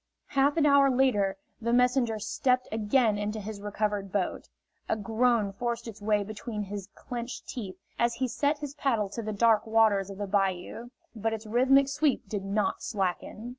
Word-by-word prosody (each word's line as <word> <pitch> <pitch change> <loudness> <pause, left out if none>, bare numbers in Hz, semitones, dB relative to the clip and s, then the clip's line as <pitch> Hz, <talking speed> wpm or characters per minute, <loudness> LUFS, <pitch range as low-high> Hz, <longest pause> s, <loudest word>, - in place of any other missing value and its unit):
Half 280 +2 +2
an 310 - +4
hour 280 -1 +6
later 240 -7 +2 0.2
the 235 +1 0
messenger 250 -2 +3
stepped 250 +4 0
again 220 0 +2
into 210 +1 -2
his 210 0 -7
recovered 205 -1 -2
boat. 195 -2 -2 0.4
A - - +2
groan 225 -1 +1
forced 235 +2 -3
its 215 -2 -9
way 210 0 +2
between 215 +1 -5
his 200 0 -6
clenched 240 0 -6
teeth 200 -8 -6 0.2
as 235 0 +2
he 260 +2 -1
set 285 +4 0
his 290 -1 -6
paddle 235 -8 0
to 230 - -5
the 215 -1 -4
dark 220 +1 +3
waters 220 -3 +3
of 195 - -8
the 205 - -3
bayou, 195 +3 -1 0.3
but 225 +1 -1
its 220 0 -5
rhythmic 260 +5 +4
sweep 275 -4 0
did 200 -1 -3
not 200 +2 -1
slacken. 205 +2 -3
220 Hz, 175 wpm, -28 LUFS, 205-250 Hz, 0.4 s, hour